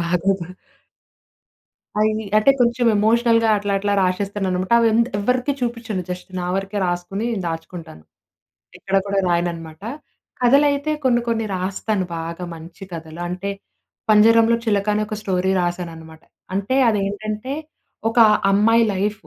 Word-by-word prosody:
బాగోదు. 180 +1 0 1.5
అవి 215 0 +3 0.3
అంటే 215 +6 +5
కొంచెం 240 0 +2
ఎమోషనల్‌గా 230 +2 +3
అట్లా 205 0 -2
అట్లా 205 +1 -1
రాసేస్తాననమాట. 185 0 -1
అవెందు 230 +1 +3
ఎవరికీ 250 +6 0
చూపించను, 230 -5 -3
జస్ట్ 180 0 -6
నా 175 - -3
వరకే 195 +1 -2
రాసుకొని 175 +5 -3 0.2
దాచుకుంటాను. 165 - -7 0.8
ఎక్కడ 195 0 -1
కూడా 200 0 0
రాయనన్నమాట. 170 -1 -2 0.6
కథలైతే 280 +4 +3
కొన్ని 240 -2 +3
కొన్ని 225 -1 0
రాస్తాను 190 +2 -2
బాగా 165 +2 -5
మంచి 165 +4 -12
కథలు. 160 0 -8
అంటే, 185 +3 -4 0.6
'పంజరంలో 225 +2 +5
చిలక' 205 -2 +1
అనే 210 - 0
ఒక 215 - -5
స్టోరీ 190 -1 0
రాసాననమాట. 165 -2 -5 0.3
అంటే 200 +7 0
అదేంటంటే, 210 +3 -2 0.6
ఒక 230 +2 -1 0.3
అమ్మాయి 225 +4 +4
లైఫూ 205 +2 -2
200 Hz, 120 wpm, -21 LUFS, 180-225 Hz, 1.5 s, అంటే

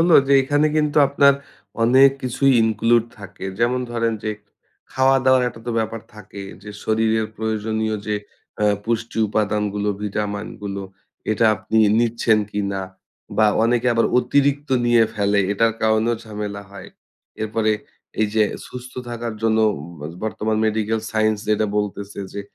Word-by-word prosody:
হল 170 +2 +3 0.2
যে 140 - +2
এইখানে 145 +3 +2
কিন্তু 150 -1 0
আপনার 140 0 +5 0.5
অনেক 130 +3 +6
কিছুই 130 +2 +2
include 115 +1 +2
থাকে। 100 -1 -10
যেমন 120 +2 +1
ধরেন 115 -1 0
যে 110 - 0 0.6
খাওয়াদাওয়ার 130 -1 +4
একটা 115 - -12
তো - - -1
ব্যাপার 110 0 -2
থাকে, 105 -1 -10 0.2
যে 105 - -9
শরীরের 110 0 +1
প্রয়োজনীয় 110 0 -2
যে 105 - 0 0.5
এ - - +4 0.2
পুষ্টি 115 0 -2
উপাদানগুলো 105 -1 -1
ভিটামিনগুলো 105 -1 -4 0.5
এটা 110 +1 +2
আপনি 110 +4 -3 0.2
নিচ্ছেন 115 -2 +2
কিনা 100 -1 -2 0.5
বা 110 - +5 0.2
অনেকে 120 +1 +1
আবার 115 - +3
অতিরিক্ত 145 +2 +1 0.2
নিয়ে 120 -1 +5
ফেলে। 100 -1 +2
এটার 115 +2 +2
কারণেও 110 +2 +2
ঝামেলা 105 -2 -5
হয়। 100 - -10 0.5
এরপরে 110 0 0 0.5
এই 110 - +3
যে 110 - +4 0.2
সুস্থ 125 0 -9 0.2
থাকার 120 -1 -4
জন্য 110 0 +2 0.2
উম 75 - -9
বা 75 - -5 0.2
বর্তমান 110 0 -1
মেডিকেল 110 +1 0
সায়েন্স 110 0 +1
যেটা 110 0 +2
বলতেছে 100 -1 -3
যে 100 - -4
110 Hz, 140 wpm, -21 LUFS, 105-120 Hz, 0.6 s, অনেক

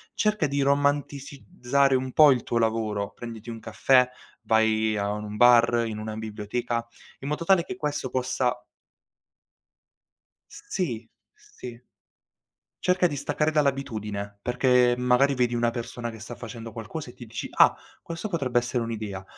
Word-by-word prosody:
cerca 210 -7 +1
di 140 +1 -2
romanticizzare 140 -1 0
un 130 0 -1
po' 150 -2 +8
il 125 -2 +2
tuo 120 - -1
lavoro: 110 -3 0
prenditi 115 -1 -9
un 115 - -7
caffè, 125 +2 +3 0.3
vai 110 -1 +2
a 100 0 -1
un 105 0 -5
bar, 120 0 +5
in 110 -1 -5
una 110 0 -5
biblioteca. 110 +2 -3 0.3
In 135 - -7
modo 150 +3 -3
tale 190 -1 +4
che 190 - -6
questo 150 -5 -3
possa 125 -1 -1 1.9
S - - -12
sì, 120 - -3 0.3
sì. 120 -2 -11 1.0
Cerca 180 0 +3
di 145 -4 -5
staccare 150 +2 0
dall'abitudine, 110 -9 -2
perché 125 +1 +3
m - - -5
magari 125 +3 +3
vedi 125 -1 +1
una 120 0 +2
persona 120 0 -5
che 110 -1 -10
sta 110 +3 -8
facendo 115 -1 -8
qualcosa 115 +6 -7
e - - -12
ti 120 - -11
dici: 110 0 -6
"Ah, - - +6 0.3
questo 170 +6 -6
potrebbe 135 -9 +1
essere 120 0 -2
un'idea". 105 -4 -5
120 Hz, 150 wpm, -26 LUFS, 110-140 Hz, 1.9 s, po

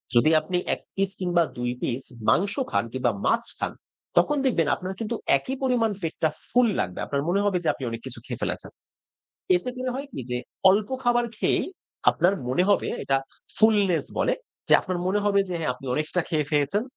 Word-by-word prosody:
যদি 135 +6 +6
আপনি 180 +3 -2 0.2
১ - - -4 0.2
পিস 195 0 +1
কিংবা 175 -2 +2
২ 120 0 -1
পিস 125 +2 -2 0.3
মাংস 200 +2 +3 0.2
খান - - +2
কিংবা 125 -2 +1
মাছ 230 0 +3 0.2
খান, - - -1 0.5
তখন 295 0 +4
দেখবেন 170 - +2
আপনার 185 +1 -5
কিন্তু 230 +1 -2 0.2
একই 260 - -4
পরিমাণ 240 -4 +2
পেটটা 160 -1 0 0.2
ফুল 245 0 +4
লাগবে। 90 -1 -2
আপনার 140 -1 -1
মনে 195 +3 +2
হবে 195 -3 +2
যে - - -1
আপনি 135 - -9
অনেক 115 0 -5
কিছু - - -8
খেয়ে - - -6
ফেলেছেন। - - -3 0.9
এতে 250 +8 -3
করে 255 0 -2
হয় 280 +2 -4
কি? - - -5
যে 125 - 0 0.3
অল্প 205 +2 +2
খাবার 240 0 +3
খেয়েই - - +1 0.5
আপনার 180 +4 +2
মনে 135 +8 +2
হবে 200 - +3 0.2
এটা 135 - +2 0.4
fullness 205 -5 +4
বলে। - - +2 0.3
যে - - +7
আপনার 185 -1 -3
মনে 200 +2 +2
হবে 200 -1 +4
যে 180 - -3
হ্যাঁ 155 -6 -1
আপনি 135 - -15
অনেকটা 155 +4 0
খেয়ে 155 -4 0
ফেলেছেন। 150 +8 +2
185 Hz, 190 wpm, -25 LUFS, 150-215 Hz, 0.9 s, যে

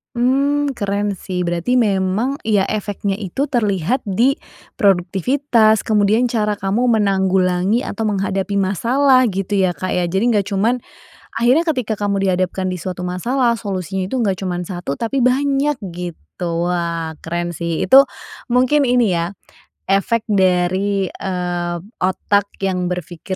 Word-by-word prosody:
Mmm. 280 +4 +1
Keren 205 -1 -1
sih. 180 -1 -3
Berarti 175 +8 0
memang, 210 +5 +1
iya 210 -3 +2
efeknya 205 -1 -2
itu 215 +8 -2
terlihat 215 - 0
di 235 +8 +3 0.5
produktivitas 215 - +2
kemudian 215 +2 +3
cara 210 -3 0
kamu 205 +6 0
menanggulangi 190 +2 +1
atau 225 - -4
menghadapi 195 0 -1
masalah 255 +7 +3
gitu 195 +1 -2
ya 185 -1 +2
Kak, 185 - -3
ya? 180 - +1
Jadi 190 +4 0
enggak 200 -1 +1
cuman, 220 +6 +1 0.6
akhirnya 250 +8 +3
ketika 255 -8 0
kamu 200 -1 0
dihadapkan 185 +1 -1
di - - -3
suatu 180 +1 -5
masalah 235 +7 0
solusinya 190 -2 -3
itu 230 - -4
enggak 195 -4 0
cuman 180 -2 -3
1, 175 -6 -4
tapi 230 +4 -2
banyak 275 +3 +2 0.2
gitu. 175 -1 -6 0.5
Wah, 170 -2 -2
keren 175 +1 -2
sih. 170 0 -2
Itu 270 +1 +7 0.5
mungkin 255 +4 +3
ini 245 -4 +3
ya, 170 +3 -2 0.5
efek 200 +4 +1
dari, 190 0 +1
eee, 175 -2 -3 0.2
otak 200 +2 +1 0.2
yang 180 -2 0
berpikir 180 +1 -5
200 Hz, 135 wpm, -19 LUFS, 185-235 Hz, 0.6 s, Itu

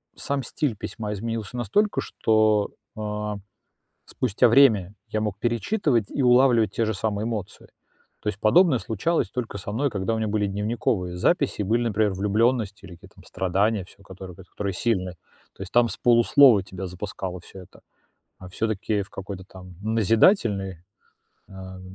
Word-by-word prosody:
сам 140 -1 -2
стиль 130 0 -2
письма 105 +1 -5
изменился 115 +2 -5
настолько, 200 - +1
что, 110 -1 +2 0.3
а, 105 -1 -4 0.7
спустя 120 -2 +1
время 110 -7 +4
я 110 - -2
мог 105 -2 -3
перечитывать 120 - 0
и 140 - -2
улавливать 125 -3 +4
те 115 - -1
же 110 -1 -1
самые 105 +1 -2
эмоции. 105 -4 -5 0.5
То - - -4
есть 100 - -3
подобное 155 - +4
случалось 115 - -1
только 115 -5 -4
со 100 +1 -6
мной, 135 +5 0
когда 100 +2 -2
у 110 - -2
меня 110 -1 -1
были 105 -1 0
дневниковые 100 -3 -2
записи, 140 - +1
и - - -2
были, 115 +5 +1
например, 105 -1 +1
влюблённость 105 +2 0
или 90 - -11
какие-то 85 - -18
там - - -17
страдания, 95 +2 0
всё, 100 +1 -19
которые 95 -1 -10
которые 95 +1 -5
сильные. 95 -2 -1 0.4
То - - -10
есть 90 - -9
там 120 -1 +4
с - - -3
полуслова 120 -2 +5
тебя 95 0 -7
запускало 90 0 -6
всё 95 +2 -13
это, - - -18 0.6
а 95 - -11
всё-таки 105 0 -2
в 95 - -13
какой-то 95 -1 -8
там 90 -1 -13
назидательной 110 - +2 0.7
ам, 95 -1 -10
105 Hz, 160 wpm, -24 LUFS, 95-115 Hz, 0.7 s, полуслова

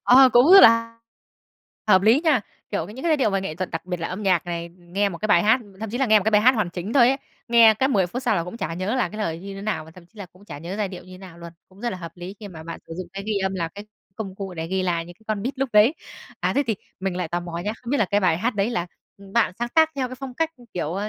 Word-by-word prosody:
Ờ, 260 +1 +8
cũng 250 +9 +6
rất 390 - +11
là 230 0 +5 0.9
hợp 190 -2 +6
lý 225 +7 +5
nha. 290 -8 +4 0.3
Kiểu, 160 - -2
những 210 +6 -11
cái 325 +5 -1
giai 310 - +4
điệu 255 -7 +1
về 195 0 0
nghệ 175 -5 -5
thuật 185 -1 -4
đặc 165 - -5
biệt 180 -1 -4
là 165 - -3
âm 190 +4 -5
nhạc 180 -3 +1
này, 170 -1 -4
nghe 190 +4 -1
một 170 - -7
cái 215 - -2
bài 175 -4 +5
hát 220 +5 +4 0.2
thậm 220 -2 -4
chí 245 - -3
là 270 - +2
nghe 215 -1 +6
một 205 - -5
cái 220 - +2
bài 210 -1 +5
hát 255 +2 +6
hoàn 215 -6 -1
chỉnh 180 +5 -5
thôi 245 -3 +6
ấy, 270 - +1 0.3
nghe 230 -2 +7
cái 265 +5 +1
10 195 -8 +2
phút 250 +8 -5
sau 235 -5 +1
là 170 - -1
cũng 180 +6 -8
chả 165 -6 -4
nhớ 185 +7 -2
là 255 - +1
cái 215 - -9
lời 165 -6 -2
như 195 +1 -8
thế 195 - -8
nào, 210 -6 -2
và 160 - -14
thậm 170 0 -16
chí 220 - -22
là 200 - -7
cũng 185 +4 -21
chả 145 -6 -9
nhớ 170 +5 -6
giai 210 -3 -1
điệu 180 -2 -9
như 185 0 -12
nào 185 -3 -12
luôn. 170 -1 -10 0.2
Cũng 190 +1 -19
rất 240 0 -2
là - - -5
hợp 170 -2 -8
lý 175 +2 -8
khi 205 - -8
mà 165 -4 -10
bạn 165 +1 -7
sử - - -8
dụng 185 - -5
cái 195 0 -6
ghi 215 -2 0
âm 190 0 -1
là 170 -3 -2
cái 205 +4 -11 0.3
công 195 -4 -6
cụ 190 -2 -7
để 160 0 -4
ghi 190 +2 -1
lại 170 -2 -1
những 175 - -12
cái 220 - -27
con 210 -2 -1
beat 260 +3 -4
lúc 270 -1 0
đấy. 215 +8 +5 0.5
À, - - 0
thế 280 - +3
thì 225 - +1 0.3
mình 190 -2 -2
lại 180 -3 -3
tò 175 +2 -2
mò 170 -1 -6
nhá. 205 +5 -3
Không 235 - -6
biết 285 - +1
là 220 - +3
cái 205 +2 +1
bài 175 -4 +2
hát 230 +4 -1
đấy 200 +3 0
là, 180 -7 -2 0.3
ừm, 200 -1 -14
bạn 235 -5 +2
sáng 240 0 -2
tác 320 +4 +4
theo 255 -2 -1
cái 255 - -7
phong 265 -1 -8
cách, 325 +3 0 0.2
kiểu, 165 -3 -2
ơ, 205 +2 -3
200 Hz, 335 wpm, -23 LUFS, 180-230 Hz, 0.9 s, rất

